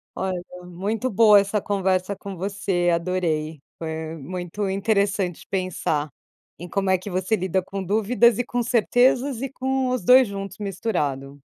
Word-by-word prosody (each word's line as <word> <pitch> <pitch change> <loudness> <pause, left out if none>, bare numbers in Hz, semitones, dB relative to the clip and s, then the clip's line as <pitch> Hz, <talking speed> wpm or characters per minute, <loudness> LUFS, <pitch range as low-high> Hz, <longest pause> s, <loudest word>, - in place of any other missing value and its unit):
Olha, 185 -2 -2 0.2
muito 200 +8 -3
boa 210 -1 +6
essa 200 +1 0
conversa 190 -1 0
com 195 0 -8
você, 190 -1 -1
adorei, 165 -3 -1 0.2
foi 160 0 -5
muito 180 +6 -4
interessante 195 -2 0
pensar, 180 -5 -1 0.5
em 175 - -8
como 195 +1 -1
é 190 - +4
que 185 +3 -8
você 185 +3 0
lida 190 -1 0
com 195 +1 -5
dúvidas, 220 +4 +3
e - - +2
com 245 - -1
certezas, 245 +2 +2
e 270 - -2
com 265 0 -1
os 250 -5 -1
dois 255 +5 +7
juntos 195 -1 -6
misturado. 150 -10 -3
195 Hz, 150 wpm, -23 LUFS, 180-215 Hz, 0.5 s, dois